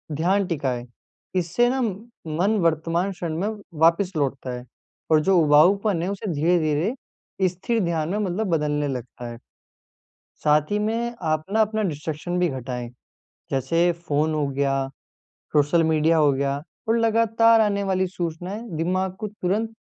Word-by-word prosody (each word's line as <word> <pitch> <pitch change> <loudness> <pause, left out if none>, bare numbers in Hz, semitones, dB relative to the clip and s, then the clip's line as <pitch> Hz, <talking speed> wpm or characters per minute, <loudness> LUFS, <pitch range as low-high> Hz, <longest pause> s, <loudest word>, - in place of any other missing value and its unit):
ध्यान 190 +6 +2
टिकाए, 130 -7 -2 0.5
इससे 185 +8 +2
ना 265 +1 0
मन 205 -3 -2
वर्तमान 165 +3 +1
क्षण 170 -3 -4
में 200 - 0 0.3
वापस 170 +4 +4
लौटता 135 -3 -2
है 125 - -9 0.5
और 155 - +6
जो 190 +2 +3
उबाऊपन 170 +5 +4
है, 180 - -1
उसे 200 0 -4
धीरे-धीरे 170 - -1
स्थिर 215 +6 -1
ध्यान 165 -2 -1
में 205 - -1
मतलब 200 +1 -1
बदलने 150 -1 0
लगता 125 -1 -6
है। 115 - -9 1.1
साथ 150 0 +3
ही 205 - +1
में 230 +3 -1 0.2
आप 155 0 -1
ना 220 - +3
अपना 220 0 +1
डिस्ट्रैक्शन 160 0 -3
भी 180 -1 +2
घटाएँ, 125 -2 -5 0.6
जैसे 165 +7 +2
फ़ोन 155 -2 -1
हो 150 -2 0
गया, 135 0 0 0.7
सोशल 150 +3 +3
मीडिया 160 +1 +3
हो 150 -2 +5
गया 140 +1 0 0.3
और 230 +1 +3
लगातार 230 0 +4
आने 200 -1 +1
वाली 190 -1 +1
सूचनाएँ 180 +3 -4 0.2
दिमाग 185 +3 0
को 215 - -3
तुरंत 210 +2 -2
170 Hz, 150 wpm, -24 LUFS, 150-200 Hz, 1.1 s, और